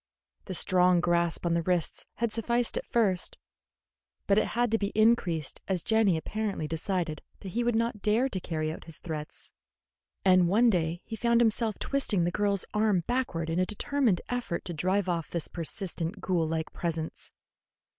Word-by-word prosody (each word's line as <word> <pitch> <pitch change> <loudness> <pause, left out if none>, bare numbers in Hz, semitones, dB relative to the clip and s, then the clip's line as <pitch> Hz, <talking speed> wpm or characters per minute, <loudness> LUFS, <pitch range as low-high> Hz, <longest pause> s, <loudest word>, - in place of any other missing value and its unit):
The 185 - -4
strong 180 +1 +4
grasp 170 0 +1
on 170 - +2
the 170 - +2
wrists 175 -1 -1
had 235 -2 -1
sufficed 235 +1 0
at - - -3
first, 200 -6 +1 0.9
but 200 +1 +4
it - - 0
had 240 -2 +2
to 225 - +2
be 200 - -1
increased 205 - +2
as 185 -3 -1
Jenny 220 -6 +3
apparently 205 -2 -3
decided 165 -1 -2 0.2
that 195 - -6
he 235 +6 -1
would 240 -1 +1
not 230 -2 0
dare 220 +6 +2
to 195 -8 -3
carry 155 -3 -2
out - - -10
his 165 -1 -7
threats, 155 -2 -7 0.7
and 185 -2 +6
one 230 +5 +5
day 170 -1 -1
he 225 - -5
found 235 +1 +2
himself 225 -2 +2
twisting 240 -10 0
the 175 - +1
girl's 200 0 +1
arm 210 -4 +2
backward 240 -10 -1
in 165 +2 -1
a - - +4
determined 225 -2 +1
effort 245 -8 -3
to 175 - -4
drive 185 +4 0
off 170 -3 -1
this 170 -3 -3
persistent 175 +2 -3
ghoul 180 -4 0
like 160 0 -3
presence. 165 -2 -4
185 Hz, 175 wpm, -29 LUFS, 170-220 Hz, 0.9 s, and